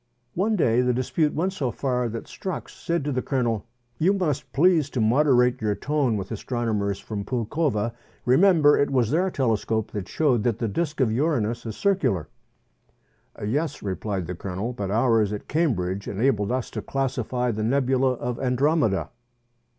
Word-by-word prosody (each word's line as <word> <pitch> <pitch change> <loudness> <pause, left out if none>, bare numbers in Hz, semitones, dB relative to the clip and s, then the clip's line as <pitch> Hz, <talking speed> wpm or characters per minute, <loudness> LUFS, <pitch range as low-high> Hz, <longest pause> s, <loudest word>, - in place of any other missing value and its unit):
One 215 +5 +1
day 125 - +3
the 125 -1 +1
dispute 150 +4 0
went 185 +4 0
so 140 -9 -1
far 125 -1 -1
that 115 +1 -5
Strux 185 -5 -6
said 170 -4 -2
to 145 - -1
the 130 -1 0
Colonel, 120 -6 -1 0.3
"You 185 +5 +4
must 160 -8 -1
please 160 -1 +3
to 130 - -3
moderate 125 +1 +3
your 105 -1 0
tone 140 -6 0
with 95 +1 -6
astronomers 110 -3 -1
from 105 -2 -5
Poulkowa: 120 0 -1 0.3
remember 150 +2 +5
it 140 - +2
was 125 -4 +1
their 180 +5 +2
tele 130 -9 +1
scope 110 0 -2
that 100 -3 -5
showed 135 -8 +2
that 115 0 0
the 115 - -1
disc 150 +7 -2
of 120 -4 +3
Uranus 120 -4 0
is 110 - -6
circular." 180 - +1 1.2
"Yes," 145 +8 -2
replied 95 -1 -3
the 90 - -4
Colonel; 95 +6 -4
"but 100 -5 -4
ours 110 -1 +2
at 105 - -5
Cambridge 100 - 0
enabled 105 -1 +1
us 130 -1 -2
to - - -4
classify 125 -2 -1
the 110 -1 -3
nebula 130 +1 +2
of 120 -1 -4
Andromeda." 130 - +1
125 Hz, 165 wpm, -25 LUFS, 110-145 Hz, 1.2 s, remember